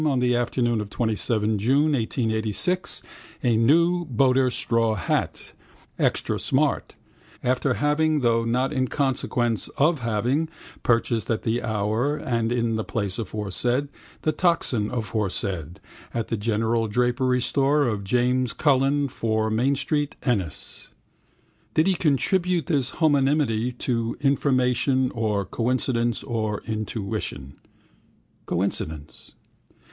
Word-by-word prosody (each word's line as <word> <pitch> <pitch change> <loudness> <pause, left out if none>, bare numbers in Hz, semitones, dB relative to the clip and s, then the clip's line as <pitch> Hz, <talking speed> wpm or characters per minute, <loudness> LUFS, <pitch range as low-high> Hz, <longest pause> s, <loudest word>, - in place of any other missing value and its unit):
on 140 -3 +1
the 125 -1 +2
afternoon 120 -1 0
of 105 - -6
27 110 -1 0
June 140 +8 +2
1886 115 - -1 0.4
a 120 -2 +3
new 170 +10 +3
boater 130 -1 +3
straw 115 -2 +1
hat, 90 - -2 0.5
extra - - +1
smart - - 0 0.5
(after 130 +1 +1
having, 150 +1 +1
though 115 -1 +2
not 125 +5 0
in 130 -2 0
consequence 125 -4 0
of 155 +2 +3
having, 120 +7 0 0.3
purchased 115 -3 +1
at 115 -2 -1
the 115 +2 0
hour 110 +5 0
and 115 -4 -1
in 115 -2 0
the 110 - -2
place 100 -3 -3
aforesaid, 115 +6 -1 0.3
the 155 - +2
toxin 150 - +1
aforesaid), 100 -7 -2 0.4
at 115 -2 -2
the 115 - 0
general 115 +1 0
drapery 125 +3 +1
store 140 +4 +2
of 105 -4 -2
James 125 +3 +1
Cullen, 140 0 +2
4 110 -3 -1
Main 125 +6 +2
street, 145 +1 -1
Ennis. 100 - -3 0.9
Did 155 - +4
he 195 - +3 0.2
attribute 175 +5 +1
this 140 -7 0
homonymity 135 -6 +1
to 115 -2 -1
information 130 -2 +2
or 105 -4 -1
coincidence 120 0 0
or 110 -4 -2
intuition? 110 - -4 0.9
Coincidence. 80 -5 -3
120 Hz, 115 wpm, -24 LUFS, 110-135 Hz, 0.9 s, Did